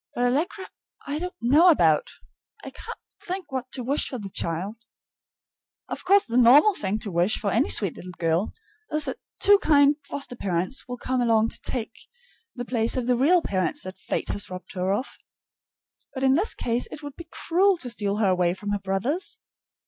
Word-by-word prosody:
But 245 - 0
Allegra 315 +10 0 0.4
I 290 +2 -3
don't 360 +2 -5
know 300 +9 +6
about; 160 - +3 0.5
I - - -7
can't - - -9 0.3
think 365 -4 -5
what 255 -1 -4
to 255 - -4
wish 280 +5 0
for 255 - -5
the 200 -4 -8
child. 185 +8 -3 1.1
Of - - -6
course 395 +1 +5
the 235 +1 -2
normal 270 - +7
thing 205 - -2
to 205 - -4
wish 175 +5 +2
for 200 - -2
any 235 +8 +2
sweet 195 -6 0
little 180 0 -9
girl 165 +4 0 0.4
is 305 0 +1
that - - -4 0.2
two 405 0 +6
kind 290 -3 +4
foster 275 -3 -4
parents 185 +5 -2
will 245 0 -5
come 255 +1 -1
along 225 -2 +3
to - - -7
take 230 -3 -3 0.6
the 245 -1 -5
place 235 0 0
of 250 - -1
the 250 0 +2
real 330 +8 +4
parents 195 +10 -1
that 185 0 -8
Fate - - -3
has 205 - -2
robbed 185 -1 -9
her 185 0 -1
of. 225 +7 -3 1.0
But 265 - -3
in 265 0 +5
this 360 +10 0
case 240 0 -1
it 300 - -9
would 290 -1 -8
be 335 - -11
cruel 375 +3 +2
to 255 -7 -4
steal 205 -3 -1
her 210 -3 +2
away 180 -1 +1
from 205 +1 -5
her 205 - 0
brothers. 245 - -2
245 Hz, 195 wpm, -25 LUFS, 200-295 Hz, 1.1 s, normal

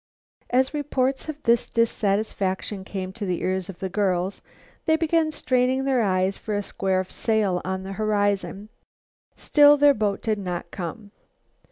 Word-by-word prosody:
As 260 +3 +2
reports 275 -1 -1
of 300 -1 -7
this 235 0 +2
dissatisfaction 200 -3 -1
came 190 -1 -5
to 215 - -7
the 180 -3 -2
ears 185 0 -1
of 190 - -8
the 190 - -3
girls, 190 -1 -1 0.5
they 315 - +5
began 325 0 +1
straining 255 -2 +1
their 265 -3 +2
eyes 190 -1 +1
for 215 - -4
a 205 - -1
square 190 -1 -1
sail 200 -1 0
on 190 0 -3
the 195 +1 -6
horizon. 205 -1 -1 0.7
Still 290 0 +5
their 290 0 +6
boat 210 -5 -1
did 215 -2 0
not 180 -3 -5
come. 200 +4 -6
205 Hz, 155 wpm, -24 LUFS, 190-255 Hz, 0.7 s, their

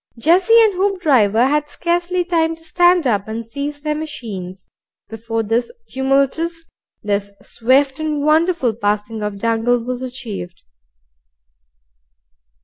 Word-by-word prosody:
Jessie 365 - +4
and 430 -2 +3
Hoopdriver 295 - +2
had 295 +1 0
scarcely 350 +3 -1
time 330 -2 +1
to 325 - -19
stand 350 0 +3
up 205 -5 0
and 225 +1 -5
seize 285 +5 -5
their 300 0 -1
machines, 205 - -7 0.4
before 225 +1 -3
this 230 - -1 0.2
tumultuous, 275 +5 0 0.4
this 200 -1 -2
swift 265 +4 +1
and 305 -2 -2
wonderful 310 -4 +2
passing 210 +1 -2
of 210 -1 -3
Dangle 230 +3 +1
was 250 +1 -4
achieved. 235 -9 -7
265 Hz, 120 wpm, -19 LUFS, 225-325 Hz, 0.4 s, Jessie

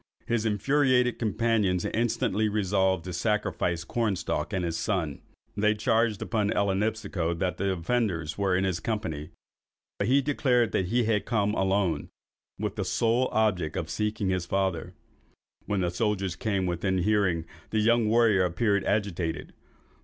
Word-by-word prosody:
His 115 -1 0
infuriated 125 +3 +2
companions 105 -4 +1
instantly 110 -2 0
resolved 95 -3 +1
to 90 - -5
sacrifice 90 -3 -1
Cornstalk 105 0 -1
and 90 -2 -1
his 85 -1 -2
son. 85 -5 -2 0.3
They 105 +1 +2
charged 110 -1 +1
upon 105 -2 0
Ellinipsico 100 -4 0
that 90 0 -1
the 100 0 0
offenders 90 -4 -1
were 100 -2 +1
in 95 - +1
his 95 -3 0
company, 80 -10 -3 0.7
but 100 - 0
he 135 +3 +4
declared 125 -6 +2
that 95 - 0
he 120 +5 +2
had 110 -2 0
come 105 -3 +1
alone, 95 -3 +1
and - - -12 0.5
with - - -3
the - - 0
sole 120 +3 +1
object 95 -8 +1
of 80 0 -3
seeking 105 -2 -1
his 90 -2 -1
father. 95 -4 -1 0.7
When 100 -2 0
the 90 -1 0
soldiers 100 -3 -1
came 100 -4 -1
within 90 +2 -1
hearing, 95 -5 +1 0.2
the 110 - -1
young 115 +1 +3
warrior 110 -4 +4
appeared 100 +3 +1
agitated. 100 -5 -2
100 Hz, 150 wpm, -27 LUFS, 90-110 Hz, 0.7 s, he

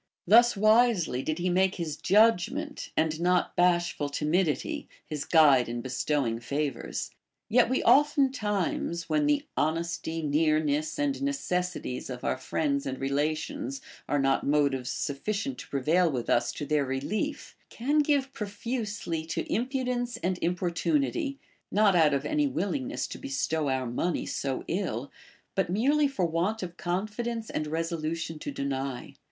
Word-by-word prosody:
Thus 235 +5 +6
Avisely 215 - +3
did 155 0 -2
he 180 +1 -1
make 190 +1 +2
his 165 -5 -3
judg 210 +2 +4
ment, 295 +2 -5
and 155 0 +1
not 180 +1 +2
bashful 175 -4 +2
timidity, 170 - 0 0.2
his 150 -3 -4
guide 145 -7 +5
in 120 0 -3
bestowing 130 -1 -1
favors. 140 +1 -3 0.4
Yet 240 +2 +4
we 260 - +1
oftentimes, 220 - +2
when 300 -1 +2
the 290 0 +2
honesty, 165 +1 -1
nearness, 155 0 +1
and 290 -1 +1
neces 180 -11 -1
sities 125 - -5
of 125 -1 -6
our - - +1
friends 140 +1 -1
and 130 -1 -4
relations 140 -1 -2 0.3
are 145 - +2
not 135 -1 +2
motives 140 -3 +1
sufficient 140 +1 -3
to - - -9
prevail 160 +5 +2
Avith 125 -4 -3
us 120 - +2
to 145 - -5
their 150 -1 +1
relief, 140 - -3
can 285 +6 0
give 280 -2 +1
profusely 205 -5 -3
to 165 - -2
im 240 +3 +1
pudence 250 -2 -2
and 180 0 0
importunity, 275 - 0 0.3
not 205 -2 +4
out 155 -4 +5
of 140 - -2
any 300 -1 +1
willingness 270 +4 -2
to - - -8
bestow 160 - -1
our 130 -1 0
money 140 +8 -1
so 135 -2 -3
ill, 145 - -2 0.4
but 190 -3 0
merely 280 +10 +3
for 235 -10 -1
want 175 +6 -1
of 175 -1 -6
confidence 215 +6 -3
and 155 - -2
resolution 165 0 -3
to - - -5
deny. 135 -2 -4
170 Hz, 145 wpm, -28 LUFS, 145-230 Hz, 0.4 s, Thus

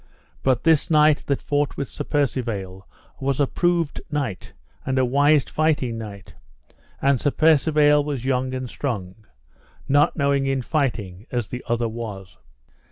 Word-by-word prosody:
But 130 -2 +1
this 160 +1 +3
knight 150 -2 +4
that 140 - -1
fought 145 0 -1
with 140 - -3
Sir - - -6
Percivale 115 -10 -2 0.3
was 135 0 -1
a 145 - +4
proved 170 +1 0
knight 140 -10 -4 0.3
and 130 - -1
a 130 - +3
wise 145 +3 +4
fighting 145 -7 0
knight, 100 -3 -9 0.7
and 135 -2 +3
Sir 145 - +2
Percivale 150 -1 +4
was 140 -4 -4
young 130 -1 0
and 130 0 -4
strong, 110 -6 -5 0.6
not 145 +3 +3
knowing 140 -2 +1
in 135 -1 0
fighting 115 - -2
as 120 -4 -3
the 125 - -6
other 120 0 +1
was. 105 -5 -7
135 Hz, 150 wpm, -23 LUFS, 115-145 Hz, 0.7 s, knight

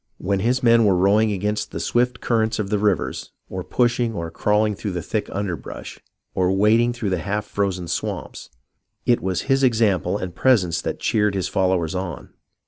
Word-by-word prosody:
When 100 +1 -1
his 125 +6 0
men 115 -1 +5
were 100 -3 +4
rowing 105 +4 +3
against 105 +2 -2
the - - -6
swift 120 0 0
current 110 -1 +1
of 105 -2 -3
the 105 - +1
rivers, 100 -8 -1 0.2
or 95 -1 -4
pushing 120 +1 0
or 85 -2 -4
crawling 105 +4 +1
through 100 -1 -5
the 90 - -3
thick 110 - -3
underbrush, 95 -4 -5 0.3
or 90 0 +1
wading 110 +5 +3
through 115 -5 -3
the 90 - 0
half 105 +4 -2
frozen 95 -4 -2
swamps, 85 - -4 0.6
it 120 -1 +3
was 95 -2 -1
his 135 0 +1
example 105 -6 +2
and 95 -4 -5
presence 100 -10 +2
that - - -4
cheered 105 -2 +1
his 95 - -1
followers 95 -4 0
on. 90 -2 -5
105 Hz, 180 wpm, -22 LUFS, 95-115 Hz, 0.6 s, men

